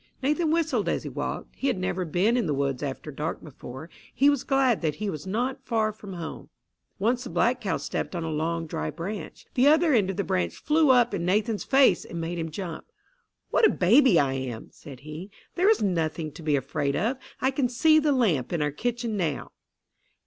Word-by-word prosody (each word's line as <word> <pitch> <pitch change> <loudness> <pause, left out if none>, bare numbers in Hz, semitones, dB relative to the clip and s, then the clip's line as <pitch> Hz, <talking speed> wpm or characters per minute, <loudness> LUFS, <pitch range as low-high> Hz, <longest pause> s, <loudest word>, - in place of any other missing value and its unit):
Nathan 300 +4 +1
whistled 325 0 +1
as - - -1
he - - -5
walked. - - -5
He 275 - -2
had 255 -7 +1
never 185 0 -2
been 185 +8 +2
in 245 - +1
the 150 - 0
woods 135 -2 -1
after 145 +1 -5
dark 150 +3 -4
before. 135 0 -9 0.2
He 280 +2 +4
was 280 -2 -1
glad 270 -4 +2
that 155 -3 0
he 210 -1 -3
was 155 +3 -7
not 255 +7 -2
far 220 -3 0
from 205 -2 -10
home. 170 -2 -7 0.5
Once 240 +5 0
the 245 - -7
black 250 +2 +1
cow 195 - -1
stepped - - -4
on 170 - -2
a 160 - -3
long, 165 +2 -1
dry 80 - -3
branch. 195 - -6
The 260 +2 +4
other 315 +1 +5
end 205 -6 +3
of 195 - -3
the 200 - 0
branch 85 - -1
flew 310 -1 +2
up 245 -3 +5
in 180 -4 -2
Nathan's 210 +4 0
face 270 0 +4
and 170 - -7
made 170 +1 -3
him 160 0 -3
jump. 170 0 -6 0.7
"What - - +2
a 435 - +8
baby 225 - +5
I 135 -2 +1
am!" 130 -4 -5
said 135 -4 -12
he. 155 +6 -8 0.2
"There 370 +3 +3
is 440 - +3
nothing 165 -4 -1
to 165 - -11
be 155 -2 +1
afraid 140 +1 -1
of. 235 +7 0 0.2
I 260 - +2
can 265 -2 0
see 310 +6 +4
the 300 -1 +2
lamp 195 - +1
in 170 - 0
our 150 - 0
kitchen 235 - -2
now." 165 -8 -2
195 Hz, 215 wpm, -26 LUFS, 155-255 Hz, 0.7 s, a